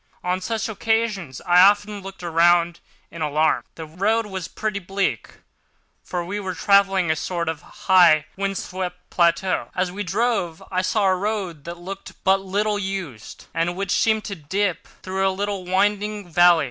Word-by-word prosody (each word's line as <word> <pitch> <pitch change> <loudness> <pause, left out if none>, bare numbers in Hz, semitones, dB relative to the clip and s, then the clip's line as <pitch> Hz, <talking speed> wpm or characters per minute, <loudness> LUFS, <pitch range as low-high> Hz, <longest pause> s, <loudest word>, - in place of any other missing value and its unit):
On 180 +1 -1
such 225 +3 -2
occasions 215 - -1
I 175 0 +4
often 205 +1 +4
looked 195 -1 -10
round 170 0 +3 0.3
in 170 - -8
alarm. 155 +1 +1
The 160 - -7
road 205 +8 0
was 190 -4 -5
pretty 215 -2 -3
bleak, 195 +1 -2 0.7
for 175 -1 -4
we 200 +4 -3
were 190 -3 -4
traversing 195 -3 +3
a - - +1
sort 170 +1 -3
of 160 -2 -3
high, 175 -5 +4
wind 195 0 -2
swept 180 -1 -6
plateau. 175 +2 +1
As 185 -1 0
we 200 +3 -5
drove, 200 -4 -1
I 185 -1 +1
saw 200 +2 +1
a 190 -1 +4
road 185 -6 -3
that 170 +1 -6
looked 190 +3 -8
but 195 0 +3
little 205 +2 -1
used, 190 - -6
and 170 +1 0
which 195 0 -3
seemed 220 -1 +2
to 205 - -4
dip 180 +3 -2 0.2
through 190 +1 0
a - - +3
little, 195 0 -3
winding 205 +2 0
valley. 175 0 +5
190 Hz, 170 wpm, -22 LUFS, 175-200 Hz, 0.7 s, valley